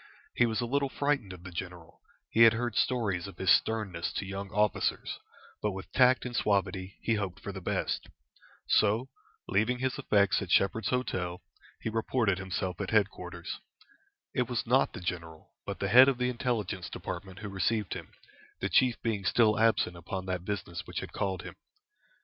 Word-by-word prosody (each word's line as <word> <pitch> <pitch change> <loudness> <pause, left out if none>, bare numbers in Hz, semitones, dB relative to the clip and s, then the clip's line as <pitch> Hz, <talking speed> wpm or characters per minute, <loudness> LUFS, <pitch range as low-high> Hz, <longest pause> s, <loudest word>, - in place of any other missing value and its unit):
He 120 - +3
was 110 +1 -1
a - - 0
little 140 +3 0
frightened 140 -8 0
of 90 -1 -10
the 95 - -8
general; 85 -1 -8 0.3
he 115 - +3
had 115 0 +9
heard 120 +1 -2
stories 100 -7 +1
of 95 - -11
his 95 - +3
sternness 105 -7 +1
to - - -3
young 100 0 -5
officers, 105 +1 0 0.4
but 105 -2 0
with 95 +1 -8
tact 125 0 +4
and 120 -1 -4
suavity 100 -2 0
he 115 - +2
hoped 100 -2 -2
for 100 - -6
the 95 -1 -7
best. - - -2 0.6
So, 110 +5 +3 0.4
leaving 110 +6 +2
his 130 0 -2
effects 100 -2 +3
at 100 - -5
"Shepherd's 100 +3 +2
Hotel," 90 -9 -2 0.4
he - - -2
reported 110 -3 +1
himself 95 -1 -3
at 95 - -3
headquarters. 105 -2 -1 0.7
It - - 0
was - - -1
not - - +3
the 90 - -7
general, 85 -3 -5 0.2
but - - -3
the - - -1
head 130 +2 +9
of 135 -2 +2
the 125 0 +1
Intelligence 110 -7 -2
Department 95 -2 -6
who 105 0 -6
received 100 +2 0
him, - - -8 0.5
the - - -1
chief 125 -3 +3
being 110 -4 -1
still 110 +1 +3
absent 110 -5 +3
upon 95 +2 -5
that 90 -2 -2
business 90 -4 -4
which - - -4
had - - -8
called 95 -3 -2
him. - - -9
100 Hz, 180 wpm, -30 LUFS, 95-115 Hz, 0.7 s, had